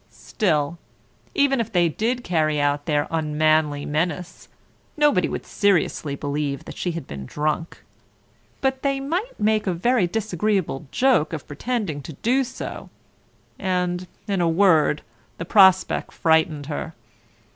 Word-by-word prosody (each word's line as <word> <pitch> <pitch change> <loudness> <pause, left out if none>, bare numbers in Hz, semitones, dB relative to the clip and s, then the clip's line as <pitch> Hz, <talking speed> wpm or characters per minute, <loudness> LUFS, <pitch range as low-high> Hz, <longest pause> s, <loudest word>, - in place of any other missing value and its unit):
Still, 165 - -1 0.6
even 275 -2 +3
if 225 - -5
they 175 -4 +3
did 235 +9 -1
carry 155 -4 +1
out 145 0 0
their 145 -2 +1
unmanly 155 -2 +1
menace, 165 +3 -3 0.5
nobody 295 -11 +3
would - - -5
seriously 175 -7 +1
believe 145 -1 -3
that - - -9
she 175 - -2
had 165 -5 -5
been 70 -2 -8
drunk. 155 +2 -3 0.8
But 265 -1 0
they 275 -1 0
might 350 - -3
make 215 0 +1
a 185 - +2
very 225 +2 +2
disagreeable 195 -6 -1
joke 245 - +2
of 155 - -5
pretending 175 - -3
to 155 - -9
do 250 - +1
so, 245 - -7 0.7
and, 180 -1 -1 0.2
in 195 -3 0
a 170 - +2
word, 165 -4 +3 0.3
the 165 - -5
prospect 190 -1 +4
frightened 160 -3 +2
her. 155 +2 -5
170 Hz, 135 wpm, -23 LUFS, 150-215 Hz, 0.8 s, prospect